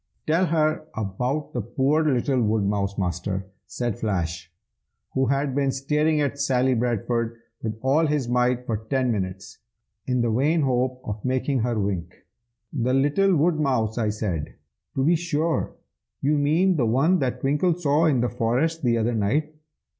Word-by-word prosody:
"Tell 165 +4 +2
her 155 -1 +1
about 125 +8 -2
the 120 - -1
poor 135 +8 +1
little 130 -2 +1
woodmouse, 100 -2 0
Master!" 95 +1 -2 0.2
said 120 -4 -3
Flash, 85 -5 -2 0.6
who 130 0 +1
had 140 +1 0
been 140 0 +1
staring 150 +3 +1
at 140 0 -1
Sally 130 -1 +2
Bradford 115 0 -1 0.2
with 110 -1 -3
all 150 +5 +3
his 145 -4 0
might 125 0 +1
for 115 -3 -1
ten 125 +3 -1
minutes, 95 -3 -4 0.5
in 125 -1 +1
the 120 -1 +1
vain 150 +8 +2
hope 130 -1 0
of 105 0 -5
making 130 +1 0
her 120 -1 0
wink. 90 -4 -2 0.6
"The 130 -2 +1
little 150 +8 +3
woodmouse?" 140 -9 +1
I 110 -2 +1
said. 100 -8 -3 0.4
"To 135 - +1
be 165 +5 +4
sure! 165 -1 -1 0.4
you 145 +2 +1
mean 160 +6 +2
the 120 -5 +2
one 150 +11 +3
that 125 -2 -2
Twinkle 150 +5 +2
saw 155 -1 +2
in 140 -6 +3
the 120 - +1
forest 130 +10 0
the 120 -3 +2
other 115 +1 0
night. 140 +9 0
125 Hz, 160 wpm, -24 LUFS, 110-150 Hz, 0.6 s, be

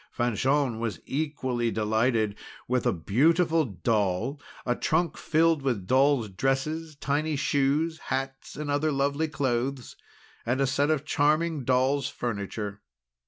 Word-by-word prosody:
Fanchon 125 +1 +1
was 110 -8 -3
equally 130 -5 -1
delighted 110 0 +1 0.3
with 125 -1 +1
a - - +4
beautiful 160 - +2
doll, 110 - -1 0.2
a 120 - +1
trunk 165 +3 0
filled 165 -1 +2
with 120 -9 -1
doll's 130 +1 +3
dresses, 135 - -1
tiny 145 +2 -1
shoes, 145 +4 +1
hats, 135 0 -4
and 150 -1 -3
other 150 +2 +1
lovely 140 +3 0
clothes, 130 -2 -2 0.5
and 125 +3 0
a 135 - +3
set 140 +3 +1
of 155 -2 0
charming 155 0 +1
doll's 130 +2 +2
furniture. 105 -4 -4
135 Hz, 125 wpm, -27 LUFS, 120-150 Hz, 0.5 s, a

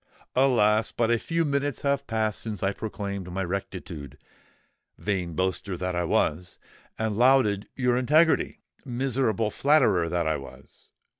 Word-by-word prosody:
"Alas! 115 -5 +3
but 115 -1 0
a 120 - +3
few 165 +5 -1
minutes 140 -1 -1
have 140 0 0
passed 110 -2 -1
since 105 -4 -5
I 95 +1 +1
proclaimed 100 -3 -5
my 95 +2 -2
rectitude, 85 -6 -6 0.8
vain 90 -4 -2
boaster 95 +1 -1
that 90 +1 -2
I 90 0 -1
was—and 90 +7 -2
lauded 120 -6 +3
your 125 -2 +1
integrity, 155 +6 +3 0.2
miserable 120 -4 0
flatterer 110 - +3
that 85 -1 0
I 80 - +1
was! 70 - -14
105 Hz, 135 wpm, -26 LUFS, 90-130 Hz, 0.8 s, Alas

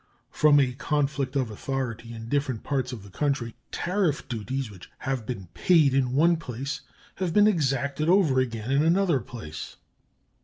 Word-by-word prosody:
From 150 -1 +5
a 130 -3 +2
conflict 140 0 -1
of 130 -5 0
authority 120 0 -4
in 115 -1 -8
different 135 -3 -1
parts 135 -3 -1
of 115 -6 -7
the 100 - -13
country 135 -3 -1 0.2
tariff 180 -5 0
duties 125 +1 -3
which 95 -3 -13
have 130 -5 -3
been 110 -7 -4
paid 155 -7 +4
in 130 -2 +1
one 165 +4 +4
place 135 -1 -5 0.4
have 180 -3 -2
been 210 0 +7
exacted 145 - +1
over 175 -9 +4
again 115 -1 -2
in 140 +1 +4
another 170 -2 +3
place. 100 -9 -8
135 Hz, 160 wpm, -26 LUFS, 120-150 Hz, 0.4 s, been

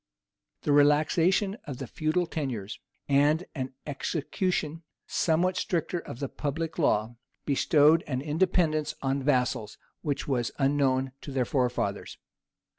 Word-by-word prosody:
The - - +1
relaxation 160 +7 +3
of 135 -4 -5
the 135 - -5
feudal 155 +7 0
tenures, 125 -11 -4 0.3
and 145 +5 +3
an 130 0 -5
execution 160 +2 -2 0.2
somewhat 180 +3 +1
stricter 175 -2 -1
of 120 - -8
the 140 +1 -3
public 160 +5 -4
law, 115 -5 +1 0.3
bestowed 150 +3 +4
an 130 -3 -1
independence 155 0 +1
on 135 +1 0
vassals 125 -6 0 0.2
which 145 -2 -2
was 125 -4 0
unknown 135 -2 +2
to 145 - -7
their 130 -2 0
forefathers. 125 -1 -1
145 Hz, 120 wpm, -28 LUFS, 135-160 Hz, 0.3 s, bestowed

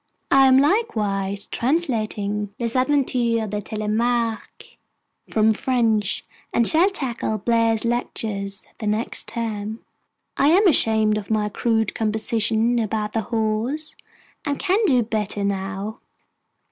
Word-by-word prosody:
I 270 0 +6
am 260 0 +6
likewise 210 - 0
translating 215 - -1
Les 235 0 -2
Aventures 250 -4 +1
de 210 +1 -3
Telemaque 225 +2 -2 0.5
from 220 0 +3
the 215 - -2
French, 225 -6 +1 0.3
and 235 - +2
shall 335 +5 +4
tackle 255 - -2
Blair's 230 +1 +1
Lectures 205 -4 -2 0.2
the 215 - -4
next 215 +2 0
term. 220 -1 -4 0.6
I 280 - +3
am 380 +7 +5
ashamed 220 -8 +3
of 200 - -10
my 215 -1 0
crude 220 0 0
composition 220 +2 +1
about 215 -1 -2
The 225 - 0
Horse, 230 +7 -1 0.5
and 285 -2 -2
can 390 +2 +1
do 250 -6 +3
better 210 -2 -2
now. 195 +2 -3
225 Hz, 120 wpm, -22 LUFS, 210-245 Hz, 0.6 s, I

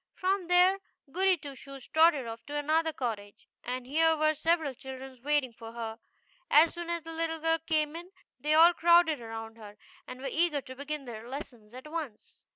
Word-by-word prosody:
From 375 -1 -1
there 360 +2 +5 0.3
Goody 375 +2 +3
Two 285 -2 -9
Shoes 270 -1 -11
trotted 315 -4 +4
off 230 0 -7
to 290 - -6
another 315 +2 +1
cottage, 220 -8 -5 0.2
and 250 0 -4
here 320 +4 +3
were 310 0 +3
several 315 -2 0
children 265 +1 -9
waiting 290 -4 +1
for 225 0 -11
her. 225 -1 -6 0.5
As 310 +3 +6
soon 345 -1 -6
as 340 -1 -2
the 325 0 -7
little 325 0 -2
girl 325 +1 +1
came 310 -1 0
in 345 +2 -8 0.3
they 305 +1 +1
all 335 +2 +8
crowded 340 -4 +4
around 225 0 -7
her, 210 -2 -12 0.3
and 255 - -8
were 270 - -5
eager 320 -4 +1
to 260 0 -10
begin 285 +1 -5
their 230 -1 -8
lessons 245 -5 -9
at 260 +4 -10
once. 300 -9 -7
295 Hz, 190 wpm, -29 LUFS, 255-325 Hz, 0.5 s, all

